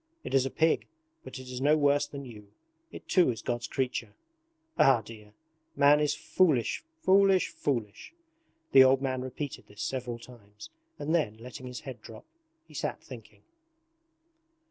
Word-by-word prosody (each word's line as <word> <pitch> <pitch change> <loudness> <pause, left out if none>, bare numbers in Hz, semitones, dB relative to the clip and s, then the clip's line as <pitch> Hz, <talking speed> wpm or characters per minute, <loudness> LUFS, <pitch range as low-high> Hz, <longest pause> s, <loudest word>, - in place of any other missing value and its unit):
It - - -6
is 135 -1 +3
a - - -4
pig, 160 +3 +1 0.4
but - - -9
it 130 0 -10
is 125 0 -6
no 150 +3 +4
worse 145 0 +2
than 140 -1 -8
you 105 -4 -12 0.4
it - - -11
too 180 -7 +4
is 115 -3 -4
God's 120 0 -2
creature. 125 -5 -3 0.6
Ah, 135 -5 +5
dear! 105 -1 -13 0.4
Man 145 +1 +5
is 150 -1 +1
foolish, 155 - +1 0.2
foolish, 195 0 +4
foolish!' 115 -8 -3 0.6
The 135 -1 +9
old 130 +1 +4
man 130 -1 -1
repeated 130 +2 -6
this 105 0 -8
several 125 -3 -3
times 105 -4 -14 0.3
and 155 +3 -2
then, 130 -11 0
letting 125 +3 -9
his 125 -1 -7
head 130 -4 -9
drop, 110 -1 -12 0.4
he - - -17
sat - - -3
thinking. - - -13
130 Hz, 160 wpm, -29 LUFS, 115-145 Hz, 0.6 s, The